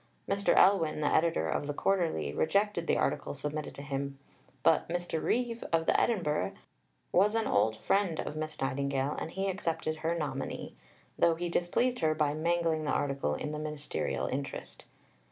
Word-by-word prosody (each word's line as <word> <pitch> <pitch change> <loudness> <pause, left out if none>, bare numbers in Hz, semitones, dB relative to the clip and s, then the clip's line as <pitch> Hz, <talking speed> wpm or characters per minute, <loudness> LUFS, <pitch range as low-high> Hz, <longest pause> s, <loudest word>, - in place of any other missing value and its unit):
Mr. 200 0 +2
Elwin, 175 -6 +4
the 150 - +1
editor 160 - +2
of 110 - -1
the 145 - -3
Quarterly, 165 - 0
rejected 200 - +1
the - - +3
article - - -1
submitted 150 +2 -4
to 140 - -7
him. 140 -1 -3 0.5
But 160 +2 +3
Mr. 175 -2 -2
Reeve, 240 -1 0
of 165 -1 +2
the - - +4
Edinburgh, 170 -10 0 0.6
was 205 +4 +4
an 225 -1 +1
old 110 - +2
friend 180 - +1
of 150 - -3
Miss 155 0 -4
Nightingale, 135 +1 0
and - - -4
he 195 +3 -2
accepted 165 -4 -2
her 165 +2 -1
nominee, 140 -4 -4 0.5
though 165 -1 +5
he 175 +1 -3
displeased 240 +9 +1
her 155 -1 +2
by 150 -2 +1
mangling 165 0 +1
the - - -1
article 140 - 0
in 150 - -4
the 150 - -4
Ministerial 150 -1 -3
interest. 135 +1 -5
155 Hz, 170 wpm, -31 LUFS, 145-175 Hz, 0.6 s, though